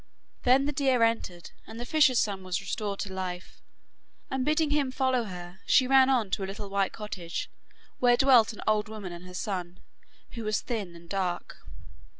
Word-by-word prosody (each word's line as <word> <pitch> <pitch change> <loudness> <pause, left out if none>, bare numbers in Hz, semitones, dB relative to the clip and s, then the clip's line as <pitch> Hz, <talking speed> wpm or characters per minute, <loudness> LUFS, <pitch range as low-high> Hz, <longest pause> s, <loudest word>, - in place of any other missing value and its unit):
Then 260 +2 +5
the 290 - 0
deer 265 -4 +2
entered, 205 -7 -1 0.2
and 225 +1 -9
the 240 - -4
fisher's 295 -2 +4
son 200 -4 0
was 185 0 -2
restored 200 0 -3
to 195 -2 -5
life, 185 -1 -6 0.7
and 265 -1 0
bidding 305 +1 +1
him 290 -3 +1
follow 260 -2 +1
her, 180 -1 -9
she 260 - +5
ran 265 0 +5
on 235 -7 +1
to 195 - -1
a - - -3
little 200 0 -7
white 195 -1 +1
cottage 190 -6 -5 0.5
where 245 -1 +5
dwelt 255 -5 +5
an 215 - -9
old 215 0 +2
woman 210 -4 -7
and 175 +1 -10
her 180 - -10
son, 180 -3 -4 0.5
who 230 - -6
was 215 -1 0
thin 205 -8 -4
and 170 0 -14
dark. 180 -2 -3
215 Hz, 185 wpm, -28 LUFS, 190-255 Hz, 0.7 s, Then